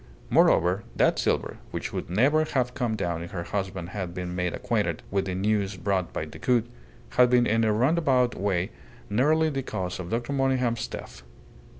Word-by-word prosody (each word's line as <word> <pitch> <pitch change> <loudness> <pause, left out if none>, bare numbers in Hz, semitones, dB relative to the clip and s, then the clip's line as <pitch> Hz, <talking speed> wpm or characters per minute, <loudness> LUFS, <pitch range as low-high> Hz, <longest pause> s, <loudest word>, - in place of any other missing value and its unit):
Moreover, 90 +5 +4
that - - +3
silver, - - 0
which - - -5
would - - -4
never 135 - +3
have 130 -5 -1
come 120 -4 -1
down 85 -5 -2
if 85 - -6
her 85 -2 -4
husband 95 -1 -4
had 95 -3 -5
been 90 -1 -4
made 90 -1 0
acquainted - - -1
with 95 0 +1
the 95 -1 -3
news 100 0 0
brought 95 -1 -1
by - - -3
Decoud, 120 -2 0 0.4
had 125 0 +5
been 125 -1 +4
in 115 0 +2
a 110 - +3
roundabout 130 +1 +2
way 95 -1 -1 0.4
nearly 155 +8 +3
the 135 -1 -2
cause 95 -9 -4
of 90 -1 -5
Dr. 120 +4 -2
Monygham's 130 -4 +1
death. - - -8
105 Hz, 180 wpm, -26 LUFS, 90-125 Hz, 0.4 s, had